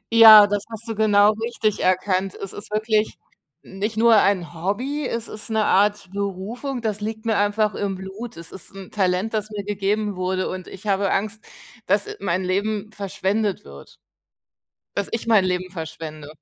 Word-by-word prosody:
Ja, 220 -2 +11
das 205 0 -1
hast 225 +1 -8
du 225 - -2
genau 210 -1 +4
richtig 225 -3 -1
erkannt. 185 +1 +1
Es 195 - -6
ist 205 - -8
wirklich 215 0 0 0.5
nicht 205 +3 -4
nur 230 0 +6
ein 185 -5 +2
Hobby, 250 - -2
es 230 -1 -3
ist 215 - -6
'ne 220 -1 +1
Art 205 0 +2
Berufung, 200 +7 -4
das 210 -2 -2
liegt 220 +1 -5
mir 225 -1 +1
einfach 205 0 +1
im 195 -2 -2
Blut. 190 +2 -8
Es 165 - -9
ist 190 - -9
'n 195 -2 -10
Talent, 190 +2 0
das 215 -1 -2
mir 210 -1 -5
gegeben 205 0 -1
wurde, 185 +1 -1
und 185 -1 -7
ich 195 - -11
habe 200 -1 +1
Angst, 215 +2 -1 0.4
dass 200 +2 +2
mein 185 -1 -1
Leben 205 +3 -1
verschwendet 200 - -2
wird, 70 0 -13 1.0
dass 200 - -1
ich 230 0 -3
mein 220 -4 +5
Leben 185 0 -2
verschwende. 160 -3 -7
205 Hz, 170 wpm, -22 LUFS, 190-215 Hz, 1.0 s, Ja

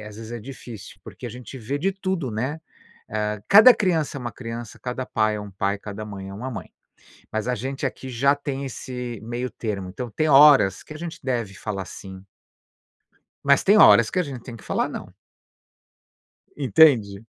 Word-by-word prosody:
é, 105 - -10
às 105 - -10
vezes, 110 0 -9
é 120 - -5
difícil 120 -3 -10
porque - - -12
a - - -6
gente 125 +3 -9
vê 120 +5 -3
de 190 +7 +1
tudo, 190 -8 -3
né. 130 +9 -3 0.5
Hã, 105 0 -2
cada 225 +5 +9
criança 165 -8 0
é - - -9
uma 120 - -4
criança, 115 -2 -7
cada 125 +1 -4
pai 110 -1 +1
é - - -5
um 105 -1 -8
pai, 100 +1 -1
cada 105 +1 -7
mãe 100 -2 -8
é 100 - -8
uma 125 +6 -5
mãe. - - -7 0.6
Mas 110 +2 -2
a 125 - +1
gente 135 +3 -4
aqui 130 0 -4
já 135 +4 +3
tem 140 -1 -4
esse 125 -3 -6
meio 120 +2 -4
termo. 100 -5 -4
Então, 120 +6 -6
tem 155 +9 -1
horas 135 -9 +7
que 155 - -10
a - - -8
gente 170 0 -7
deve 120 -6 -2
falar 100 -1 -5
sim. 95 0 -10 1.2
Mas 140 0 +4
tem 205 +2 +5
horas - - +7
que 185 - -1
a - - +2
gente 130 -5 -8
tem 120 - -9
que 110 - -14
falar - - 0
não. - - -8 1.4
Entende? 115 -6 +4
120 Hz, 195 wpm, -24 LUFS, 105-140 Hz, 1.4 s, cada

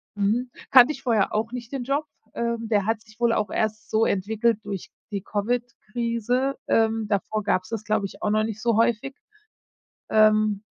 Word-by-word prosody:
Mhm, 220 +5 0 0.2
kannte 260 +3 +8
ich 270 - -12
vorher 225 -6 +1
auch 225 +2 -1
nicht 245 0 -7
den 270 -3 -3
Job. 280 +4 -1 0.3
Ähm, 235 -1 -2
der 205 -3 +2
hat 220 -1 0
sich 215 +1 -20
wohl 235 -1 +3
auch 210 -2 0
erst 215 0 -2
so 220 +1 +3
entwickelt 215 +3 +1
durch 195 -3 -6 0.2
die 200 -2 -3
Covid-Krise. 235 +3 -2
Ähm, 225 -1 +2
davor 210 +1 -1
gab 185 -2 +1
es - - -14
das, 225 -2 -4
glaube 215 -2 0
ich, - - -9
auch 210 - 0
noch 215 +1 +2
nicht 220 -1 -4
so 230 -2 +2
häufig. 235 +4 +1 1.0
Ähm 215 -1 +4
220 Hz, 185 wpm, -25 LUFS, 210-235 Hz, 1.0 s, kannte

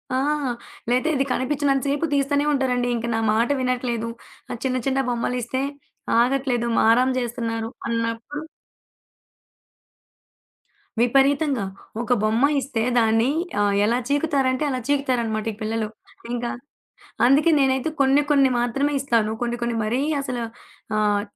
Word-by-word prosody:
ఆ! - - +2 0.7
లేతే 255 +6 +2
ఇది 275 - +1
కనిపించినంత 275 0 0
సేపు 290 +3 0
తీస్తానే 285 +1 +1
ఉంటారండి. 250 -3 +1
ఇంక 230 - -3
నా - - 0
మాట 230 +4 +2
వినట్లేదు. 245 -2 -1 0.4
ఆ - - -2
చిన్న 255 -1 0
చిన్న 270 0 +1
బొమ్మలిస్తే 245 +1 -2 0.6
ఆగట్లేదు. 250 -1 +1
మారాం 245 +4 +4
చేస్తున్నారు 230 -2 -3 0.2
అన్నప్పుడు 230 +6 -3 2.6
విపరీతంగా. 270 -1 +3 0.4
ఒక 245 +1 +1
బొమ్మ 225 +5 +3 0.2
ఇస్తే 245 -4 -3 0.2
దాన్ని 225 +2 +3 0.3
ఆహ్, 205 -1 +2
ఎలా 235 +3 +2
చీకుతారంటే 280 -2 +1
అలా 255 -2 -1
చీకుతారన్నమాట 240 -6 0
ఈ - - -13
పిల్లలు. 220 0 -1 0.5
ఇంకా 240 0 -2 0.8
అందుకే 280 +6 +5
నేనైతే 265 +2 +2
కొన్ని 275 +1 +4
కొన్ని 275 -2 +5
మాత్రమే 275 +5 0
ఇస్తాను. 230 -5 +1
కొన్ని 240 0 -1
కొన్ని 235 0 -1
మరీ 235 +5 0 0.2
అసలు 250 -3 -4 0.6
ఆహ్, 205 -1 +2
250 Hz, 120 wpm, -23 LUFS, 230-275 Hz, 2.6 s, అందుకే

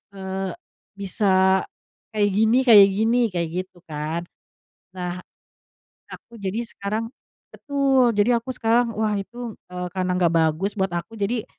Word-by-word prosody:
eee, 190 -1 -4 0.4
bisa 190 -1 +2 0.5
kayak 205 -1 +3
gini 220 +5 +3
kayak 205 -4 +9
gini?" 225 +4 +2
kayak 170 -2 -1
gitu 185 -1 -23
kan. 155 +3 -3 0.8
Nah 180 0 -4 0.9
aku 235 - -12
jadi 195 +4 -2
sekarang 215 +2 -4 0.5
betul, 270 -4 +2
jadi 230 +3 +2
aku 260 - -7
sekarang 230 +1 +2
wah 215 -1 +1
itu, 235 +3 -6 0.2
eee, 180 0 -4
karena 185 -1 -1
gak 170 -2 +3
bagus 165 +5 +1
buat 190 -2 0
aku 170 +5 -4
jadi 220 +2 -1
200 Hz, 135 wpm, -23 LUFS, 185-230 Hz, 0.9 s, kayak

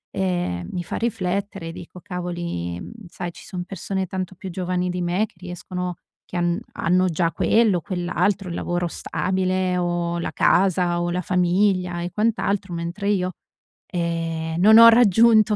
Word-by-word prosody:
ehm, 175 - -1
mi 175 -1 -3
fa - - -4
riflettere 195 -5 -2
e - - -5
dico: 175 +1 -10
"cavoli", 175 - -4
mhmm, - - -8 0.2
sai, 175 0 -6
"Ci - - -13
sono 180 -3 -5
persone 190 0 -3
tanto 185 0 -4
più 185 0 -7
giovani 180 0 -1
di 180 0 -3
me 175 +5 +1
che - - -28
riescono 180 0 -5 0.3
che 180 - -6
han 175 +2 +1
hanno 185 +2 +2
già 165 +1 0
quello, 215 -7 +3
quell'altro, 185 +1 -1
il 170 - -4
lavoro 175 0 -1
stabile 185 +1 -1
o 175 -1 -1
la - - -3
casa 180 -2 +2
o 175 - -1
la 180 +1 -1
famiglia 180 0 +1
e 175 0 -4
quant'altro, 205 -4 0
mentre 175 +5 -3
io, 185 -3 0 0.6
ehm, 165 -1 -2
non 220 +3 +8
ho 230 0 +11
raggiunto 225 -1 +5
180 Hz, 160 wpm, -23 LUFS, 175-190 Hz, 0.6 s, ho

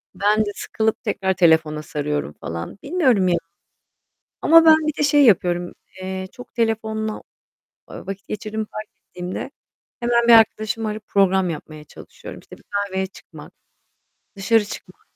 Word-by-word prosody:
ben 205 +3 +2
de - - -3
sıkılıp 220 0 -2
tekrar 190 -1 -1
telefona 160 -4 +3
sarıyorum 145 - -3
falan. 85 - -7
Bilmiyorum 265 - +2
ya, 175 - +2 1.1
ama 330 +1 +7
ben 320 -1 +8
bir 305 - 0
de - - +1
şey 290 0 +4
yapıyorum. 175 -5 +2 0.3
Eee, 190 0 -4
çok 245 -2 -13
telefonla, 220 -1 -2 0.7
ııı, - - -9
vakit 195 0 -7
geçirdiğimi 215 +1 -4
fark 215 0 -8 0.2
ettiğimde 180 +1 -6 0.5
hemen 235 0 +1
bir 235 - +8
arkadaşımı 220 0 +3
arayıp 210 0 -7
program 190 -2 +2
yapmaya 155 -1 -8
çalışıyorum. - - -12
İşte, - - -14
bir - - -23
kahveye 195 -2 -1
çıkmak, 190 - -14 0.8
dışarı 210 +2 +2
çıkmak, - - -10
205 Hz, 145 wpm, -21 LUFS, 180-225 Hz, 1.1 s, ben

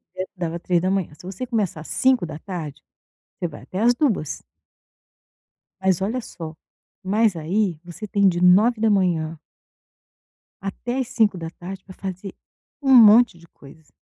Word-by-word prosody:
sério, 185 0 -4
dava 170 -1 -3
3h. 185 -1 0
Se 150 - -16
você 195 +7 -6
começar 210 -10 -2
às - - -10
17h, 170 - -1 0.6
você 175 - -2
vai 145 - -11
até 185 - -6
às 240 +3 +4
2h. 230 - -1 1.4
Mas 190 -1 +2
olha 225 +6 -1
só. 165 -6 -8 0.5
Mas 205 0 +2
aí 175 +1 -1
você 175 +5 -8
tem 200 -1 +3
de 175 -2 +1
9h 185 -5 +3 1.2
até 240 +6 -4
às 255 - -1
17h 190 -4 -2
pra 185 - -11
fazer 190 0 -6 0.5
um 270 -1 +3
monte 230 -4 +7
de 170 0 -18
coisa. 150 +2 -17
190 Hz, 135 wpm, -22 LUFS, 170-215 Hz, 1.4 s, monte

